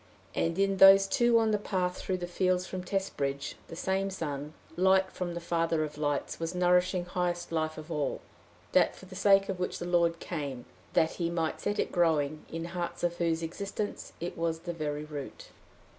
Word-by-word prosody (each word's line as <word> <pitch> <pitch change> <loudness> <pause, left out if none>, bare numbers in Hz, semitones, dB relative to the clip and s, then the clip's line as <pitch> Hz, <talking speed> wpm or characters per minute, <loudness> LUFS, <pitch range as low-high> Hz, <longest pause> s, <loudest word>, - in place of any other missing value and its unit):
And 165 +1 0
in 195 0 +2
those 195 +1 +9
two 240 +4 +3
on 225 -1 +3
the 210 - +2
path 185 -3 -1
through 185 - -2
the 175 - -4
fields 180 +1 +1
from 185 -1 -5
Testbridge, 140 -8 -2
the 165 - -8
same 190 +3 0
sun, 150 -5 -4 0.2
light 190 +1 +4
from 175 -2 -4
the - - -2
father 165 -2 0
of 150 -1 -5
lights, 145 -1 -2
was 165 +2 -3
nourishing 180 0 +3
highest 175 -1 -2
life 155 -1 -1
of 155 +2 -8
all 150 -3 -1 0.5
that - - +4
for - - -13
the 185 - -12
sake 195 0 +5
of 190 -2 -3
which 180 - -2
the - - -5
Lord 170 -1 +2
came, 140 -9 -5 0.3
that 160 - +3
he 170 - +1
might 165 -2 -2
set 205 - -1
it - - 0
growing 155 -4 +1
in 165 0 -4
hearts 175 -1 -4
of 175 0 0
whose 165 -1 0
existence 200 +5 -4
it 175 +1 -4
was 165 -1 -1
the 175 0 -4
very 150 -2 -3
root. 145 -3 -8
175 Hz, 195 wpm, -30 LUFS, 160-190 Hz, 0.5 s, those